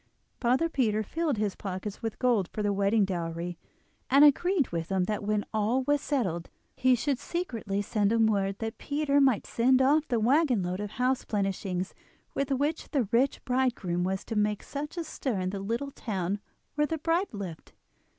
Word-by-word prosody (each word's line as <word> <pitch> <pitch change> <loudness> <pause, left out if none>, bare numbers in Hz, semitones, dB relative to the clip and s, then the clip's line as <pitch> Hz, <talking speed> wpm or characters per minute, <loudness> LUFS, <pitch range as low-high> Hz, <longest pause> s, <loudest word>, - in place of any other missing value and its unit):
Father 255 +6 +2
Peter 220 -9 +1
filled 310 +3 -1
his 205 -2 -1
pockets 195 +1 -5
with 225 -2 -3
gold 235 -8 +2
for 210 - -3
the 205 -1 +1
wedding 200 +1 +3
dowry, 170 -1 -4 0.5
and 275 +3 +7
agreed 320 +1 +3
with 165 -1 -3
him 190 -1 +2
that 210 +3 -2
when 210 0 0
all 220 +5 +1
was 290 +2 +2
settled 185 - -1 0.3
he 255 -1 +4
should 275 +1 -1
secretly 225 - -3
send 205 0 +1
him 225 -1 +4
word 195 -2 +1
that 225 0 -5
Peter 285 -1 +1
might 265 -6 +3
send 255 +2 +3
off 290 +4 +3
the 240 -3 +1
waggon 250 - +3
load 180 +1 -2
of 210 0 -3
house 255 +1 +1
plenishings 195 -3 -2 0.4
with 275 0 -1
which 285 +4 -1
the 265 -8 0
rich 255 +3 +2
bridegroom 240 -9 0
was 190 +1 -2
to 225 - -4
make 210 0 +1
such 295 +4 -6
a 340 - -1
stir 260 -8 -3
in 185 0 -1
the 200 - -4
little 235 +8 -3
town 200 -5 -3 0.3
where 295 0 +1
the 320 - -2
bride 335 +5 0
lived. 190 -6 -7
225 Hz, 185 wpm, -29 LUFS, 195-275 Hz, 0.5 s, and